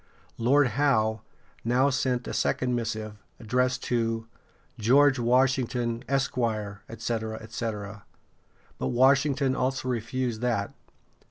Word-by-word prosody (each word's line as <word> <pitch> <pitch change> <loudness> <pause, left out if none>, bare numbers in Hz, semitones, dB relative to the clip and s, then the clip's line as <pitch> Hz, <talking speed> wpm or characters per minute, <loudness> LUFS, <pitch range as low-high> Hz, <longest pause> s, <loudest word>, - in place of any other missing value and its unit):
Lord 130 +3 +4
Howe 110 -4 +1 0.4
now 125 +4 +3
sent 130 -2 -1
a - - -4
second 125 -1 0
missive, 110 -3 -3 0.2
addressed 125 +3 0
to 115 -2 -1 0.5
"George 135 +4 +4
Washington, 125 -1 +1
Esq., 135 -2 0 0.5
etc., 110 -1 -3
etc.;" 105 -2 -5 0.8
but - - -1
Washington 135 +1 +3
also 130 0 -1
refused 120 -1 -2
that. 115 -5 -1
120 Hz, 100 wpm, -27 LUFS, 115-130 Hz, 0.8 s, Lord